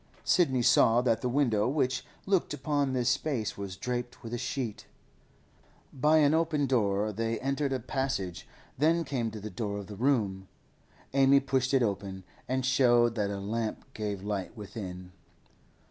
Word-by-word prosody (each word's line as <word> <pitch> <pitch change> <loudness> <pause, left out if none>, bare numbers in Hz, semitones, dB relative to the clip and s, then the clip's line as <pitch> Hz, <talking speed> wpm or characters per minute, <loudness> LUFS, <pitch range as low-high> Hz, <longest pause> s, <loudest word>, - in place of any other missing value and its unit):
Sidney 130 -9 +3
saw 115 +1 +5
that 120 -3 +1
the 125 - -1
window 120 -5 +2
which 130 -3 0 0.2
looked 190 -6 +1
upon 145 -1 0
this 125 -2 0
space 130 -5 -1
was 100 -2 -6
draped 125 +3 -4
with 115 0 -7
a - - -1
sheet. 125 -6 -4 1.1
By 150 +4 +3
an 150 -1 +4
open 160 -3 +1
door 105 -5 +1
they 115 +2 -2
entered 135 +1 -1
a 130 - 0
passage, 115 -8 -3 0.3
then 165 +3 +3
came 130 -6 -2
to 110 0 -8
the 105 +1 -7
door 105 -3 -3
of 100 - -6
the 105 - -9
room. 105 -6 0 0.7
Amy 135 0 +6
pushed 130 -1 0
it 135 -3 +3
open, 100 -3 -3 0.2
and 130 0 -1
showed 120 -3 +4
that 105 -3 -1
a 100 -1 -3
lamp 110 +3 -3
gave 105 -3 -4
light 100 +1 -4
within. 95 -4 -7
120 Hz, 160 wpm, -29 LUFS, 105-135 Hz, 1.1 s, Amy